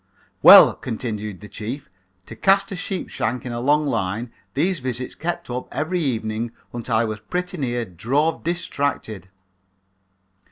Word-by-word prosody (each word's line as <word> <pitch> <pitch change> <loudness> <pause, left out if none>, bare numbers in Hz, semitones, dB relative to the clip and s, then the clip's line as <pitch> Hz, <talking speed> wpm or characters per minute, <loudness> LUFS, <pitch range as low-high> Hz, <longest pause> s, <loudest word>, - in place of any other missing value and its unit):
"Well," - - +10
continued 105 -5 -5
the 105 - -9
chief, 115 +7 -6 0.4
"to - - -10
cast 195 0 +3
a - - -3
sheep 190 +1 -4
shank 125 +1 -2
in 125 - -4
a 120 - -3
long 150 +4 +3
line, 115 -2 -2 0.2
these 170 +4 +1
visits 125 -1 -4
kept 175 +1 -4
up 125 +1 -5
every 165 +5 -1
evening 115 -5 -2 0.2
until 120 -1 -2
I 115 +1 +3
was 110 -1 -4
pretty 180 +12 -4
near 120 -4 -1
drove 135 - 0
distracted. 140 - -2
125 Hz, 150 wpm, -22 LUFS, 110-160 Hz, 0.4 s, Well